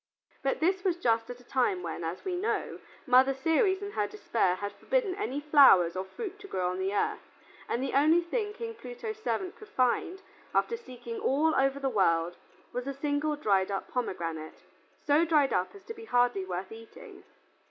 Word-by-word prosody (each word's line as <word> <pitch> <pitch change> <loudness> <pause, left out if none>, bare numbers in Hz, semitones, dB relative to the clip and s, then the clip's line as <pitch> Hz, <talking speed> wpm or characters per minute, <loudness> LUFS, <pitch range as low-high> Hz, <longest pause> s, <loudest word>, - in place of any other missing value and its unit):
But 270 +2 -1
this 370 +3 +2
was 365 -3 +1
just 230 -7 +1
at 245 - -6
the 245 - -18
time 240 -8 0
when, 170 0 -5
as 165 +3 -5
we 370 -2 -1
know, 380 +5 -2 0.3
Mother 260 0 +5
Ceres 375 - +2
in 405 - -5
her - - -1
despair 230 - 0
had 205 +2 -4
forbidden 410 - 0
any 360 -9 -3
flowers 275 - +6
or 185 - -2
fruit 405 - -7
to 405 - -10
grow 180 - -1
on 185 - -4
the 190 +1 -1
earth, 205 - 0 0.5
and 245 - -1
the 270 - -3
only 310 +5 +5
thing 415 +5 -2
King 455 +1 -6
Pluto's 435 - -7
servant 380 0 -2
could 430 - -13
find, 350 - 0 0.3
after 465 - +2
seeking 245 - -8
all 310 +4 +2
over 270 0 +2
the 275 - -1
world 175 -7 +2 0.4
was 250 +2 -4
a 275 - -3
single 295 +2 -1
dried 200 -9 +1
up 195 -1 -3
pomegranate, 165 -10 -4 0.4
so 295 +2 +4
dried 305 -4 +3
up 180 - -1
as 395 - -13
to 455 - -7
be 450 0 -11
hardly 245 - +2
worth 185 +1 -5
eating. 225 0 -12
270 Hz, 195 wpm, -29 LUFS, -, 0.5 s, flowers